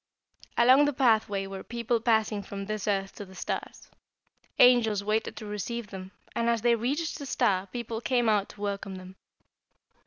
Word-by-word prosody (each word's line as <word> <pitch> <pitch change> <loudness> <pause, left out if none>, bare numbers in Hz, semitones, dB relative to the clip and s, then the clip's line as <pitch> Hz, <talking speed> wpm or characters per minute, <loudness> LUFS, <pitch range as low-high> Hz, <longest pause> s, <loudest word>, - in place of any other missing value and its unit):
"Along 260 +4 +6
the 290 - 0
pathway 220 -6 +2
were 195 0 -7
people 235 0 -1
passing 220 -2 +2
from 200 0 -7
this 215 0 -4
earth 195 -1 0
to - - -6
the 190 0 -15
stars. - - -5 0.7
Angels 225 -5 +5
waited 215 +2 -1
to 215 - -7
receive 210 +2 -5
them, 190 -1 -7 0.3
and 235 0 +1
as 230 -2 0
they 240 -1 +5
reached 280 +9 -1
the 285 - -6
star 195 -5 +1
people 230 +1 -5
came 240 -1 +1
out 210 -2 +2
to 205 - -13
welcome 200 -1 -3
them. 185 0 -10
215 Hz, 175 wpm, -28 LUFS, 200-235 Hz, 0.7 s, Along